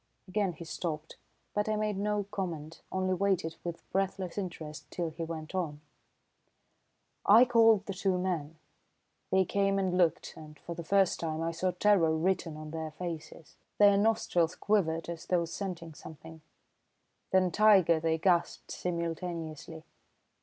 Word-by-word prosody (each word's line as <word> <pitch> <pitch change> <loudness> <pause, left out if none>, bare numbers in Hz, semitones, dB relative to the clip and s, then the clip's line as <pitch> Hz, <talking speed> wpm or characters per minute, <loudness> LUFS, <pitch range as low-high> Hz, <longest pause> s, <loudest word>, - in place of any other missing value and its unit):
Again 195 -1 0
he 165 +1 -10
stopped, 160 -1 -5 0.4
but 210 +1 0
I 215 - +1
made 210 -1 -1
no 205 +1 0
comment, 165 -5 -5
only 185 0 0
waited 185 -4 0
with 170 -1 -6
breathless 190 -2 -1
interest 165 -6 -6
till 170 -2 -3
he 160 +2 -9
went 160 0 -6
on. 165 -6 -2 1.4
"I 225 +5 +7
called 225 -4 +5
the 195 - -4
two 190 0 0
men. 165 -4 -2 0.7
They 190 0 +3
came 195 +1 +1
and 190 -2 0
looked, 175 -3 +1
and 150 -1 -12
for 170 - -7
the 170 0 -6
first 195 +2 +2
time 160 -1 -2
I 165 - -1
saw 170 +3 -1
terror 180 -3 +3
written 170 -2 0
on 155 0 -8
their 160 -1 -4
faces. 165 -1 -8 0.2
Their 205 -1 +6
nostrils 200 -5 +2
quivered 165 -6 0
as 170 -1 -7
though 175 -2 +2
scenting 170 -2 -6
something; 160 +1 -12 0.9
then 185 -1 +3
'Tiger!' 190 -5 +5
they 160 0 +1
gasped 175 0 +1
simultaneously. 165 -2 -4
175 Hz, 145 wpm, -30 LUFS, 160-195 Hz, 1.4 s, I